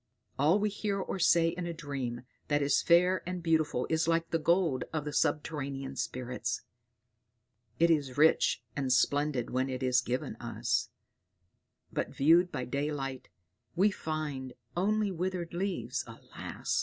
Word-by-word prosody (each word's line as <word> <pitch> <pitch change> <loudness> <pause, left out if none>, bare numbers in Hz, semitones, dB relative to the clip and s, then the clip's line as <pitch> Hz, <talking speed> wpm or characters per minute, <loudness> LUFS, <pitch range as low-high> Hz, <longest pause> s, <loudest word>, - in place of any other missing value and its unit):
All 155 +7 +5
we 210 0 +1
hear 205 0 -2
or 190 0 -3
say 165 -1 +5
in 175 +1 -4
a 170 - -4
dream 135 -6 -4 0.3
that 145 -1 +2
is 140 0 +3
fair 180 +1 +4
and 180 -1 -4
beautiful 155 -6 +1
is 160 0 +1
like 165 0 +1
the 165 - +1
gold 165 -6 +2
of 155 -2 -2
the 150 - -4
subterranean 140 -3 -1
spirits; 125 -2 -3 1.1
it 170 +1 +4
is 140 -5 0
rich 155 +2 +4
and 135 -3 -1
splendid 140 0 +2
when 130 +1 0
it 130 0 -3
is 130 0 +3
given 125 +1 -3
us, - - -1 1.0
but - - -3
viewed 170 +5 +5
by 125 - -3
daylight 140 0 -3 0.5
we 200 +4 +4
find 150 -7 -4 0.2
only 210 +3 +1
withered 180 -1 -3
leaves. 175 - -2
Alas!" - - -4
155 Hz, 145 wpm, -31 LUFS, 135-170 Hz, 1.1 s, All